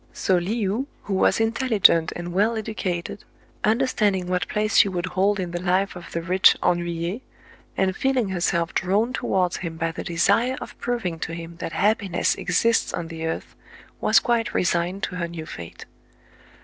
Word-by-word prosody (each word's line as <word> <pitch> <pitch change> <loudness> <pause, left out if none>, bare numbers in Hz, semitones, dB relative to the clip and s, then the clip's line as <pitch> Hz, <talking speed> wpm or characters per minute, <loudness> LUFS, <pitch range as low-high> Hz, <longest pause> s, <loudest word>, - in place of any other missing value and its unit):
So 190 - +1
Le 180 +6 -1
ou, 230 +8 -1 0.2
who 200 - -4
was 190 - +3
intelligent 225 -8 +3
and 175 0 -5
well 215 +5 +2
educated, 200 -4 -4 0.4
under 225 +5 +3
standing 205 -7 +1
what 180 -2 -1
place 215 0 0
she 200 - +6
would 180 -1 -2
hold 190 +2 +1
in 180 -2 -3
the 175 0 -4
life 185 +2 +1
of 175 -1 -10
the 170 - -3
rich 185 +2 +5
ennuyé, 175 +4 -1 0.6
and 190 0 +1
feeling 260 -5 +1
herself 175 -2 0
drawn 210 +7 +1
towards 185 -7 0
him 165 -3 -6
by 165 0 -1
the - - -6
desire 200 +9 +2
of - - -9
proving 225 -9 -2
to 165 - -4
him 170 0 -8
that 170 - -5
happiness 200 -3 +1
exists 230 0 +1
on 170 -2 -5
the 165 -1 -4
earth, 160 - -5 0.4
was - - +5
quite 235 -2 0
resigned 180 +2 0
to 180 - -3
her 170 -1 -2
new 165 -2 -7
fate. 85 - -9
185 Hz, 175 wpm, -24 LUFS, 170-215 Hz, 0.6 s, she